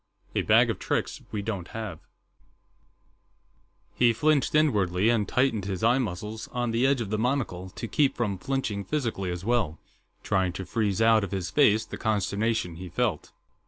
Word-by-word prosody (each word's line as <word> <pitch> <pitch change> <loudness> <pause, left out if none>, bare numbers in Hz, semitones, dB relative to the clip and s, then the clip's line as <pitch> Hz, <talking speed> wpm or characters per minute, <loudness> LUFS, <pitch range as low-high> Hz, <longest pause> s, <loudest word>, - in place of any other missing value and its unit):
A - - +1
Bag - - +4
of - - -6
Tricks - - -2
We 105 -1 -3
Don't 100 -5 -4
Have 105 -8 -5 1.9
He 120 -1 +4
flinched 150 +5 +2
inwardly, 105 - +3
and 115 -4 +2
tightened 125 -6 +1
his 95 -1 -4
eye 120 +3 +4
muscles 105 0 -4
on 120 -1 -2
the 120 +3 +2
edge 135 -3 +2
of 105 -3 -4
the 110 - 0
monocle 115 -7 -1
to 115 - -6
keep 140 +3 +2
from 100 -6 -1
flinching 115 -5 -2
physically 115 -9 -2
as 90 +1 -5
well, 110 -10 +1 0.5
trying 95 -2 +1
to 95 +1 -6
freeze 105 +2 0
out 110 -1 +5
of 100 - -3
his 95 -3 -3
face 110 -7 +4
the - - -7
consternation 105 -3 -1
he 90 0 -7
felt. 105 -4 -1
110 Hz, 170 wpm, -27 LUFS, 95-120 Hz, 1.9 s, out